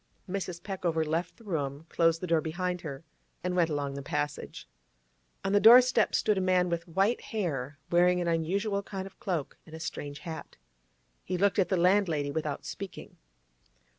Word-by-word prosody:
Mrs. 180 -2 -4
Peckover 175 -5 -1
left 165 +3 -2
the 230 - -17
room, 150 -6 -3
closed 165 -1 +2
the - - -2
door 165 -2 +2
behind 180 +2 -2
her, 140 -2 -7 0.4
and 180 0 -1
went 170 -2 +3
along 145 -2 -2
the 140 - -5
passage. 145 +2 -4 0.8
On 195 - +1
the 205 - +6
doorstep 240 0 +7
stood 210 -3 +2
a - - 0
man 185 -1 +2
with 170 0 -2
white 195 +7 +1
hair, 145 - -3
wearing 180 +1 +4
an 175 - -1
unusual 195 +5 0
kind 195 -1 -6
of 195 - -13
cloak 175 -8 -3
and 160 - -11
a - - -8
strange 145 -3 -5
hat. 165 -3 -8 0.7
He 185 - -2
looked 200 +2 +2
at 190 - +2
the 190 - +2
landlady 170 -5 +2
without 150 -2 -3
speaking. 195 -1 -8
175 Hz, 175 wpm, -29 LUFS, 160-195 Hz, 0.8 s, doorstep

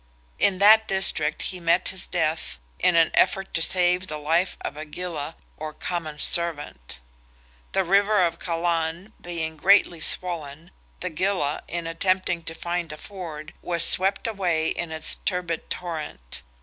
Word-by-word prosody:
In 195 -2 +3
that 220 +3 +7
district 190 -5 0
he 185 - -3
met 170 +1 +2
his 185 -1 -5
death 160 - -1 0.2
in 180 - +3
an 165 -1 +5
effort 195 +1 +2
to 165 - 0
save 180 +1 +3
the 155 - -5
life 165 +5 0
of - - -5
a 155 - -6
gilla, 160 -1 -5 0.2
or 155 0 -6
common 160 -4 -4
servant. 155 - -3 0.7
The 195 - +2
river 200 +1 +3
of 170 - -3
Callan 170 +3 -2
being 160 -2 -4
greatly 180 0 +4
swollen, 165 -1 +2 0.3
the 180 - -3
gilla, 160 -3 0
in 170 -1 -4
attempting 175 +1 0
to 165 - -4
find 175 -1 -3
a 155 - -8
ford, 160 -5 -8
was 170 -1 +2
swept 195 +2 +1
away 180 -8 0
in 175 -2 -4
its 160 -1 +3
turbid 180 -3 -3
torrent. 155 - -5
170 Hz, 150 wpm, -25 LUFS, 160-185 Hz, 0.7 s, that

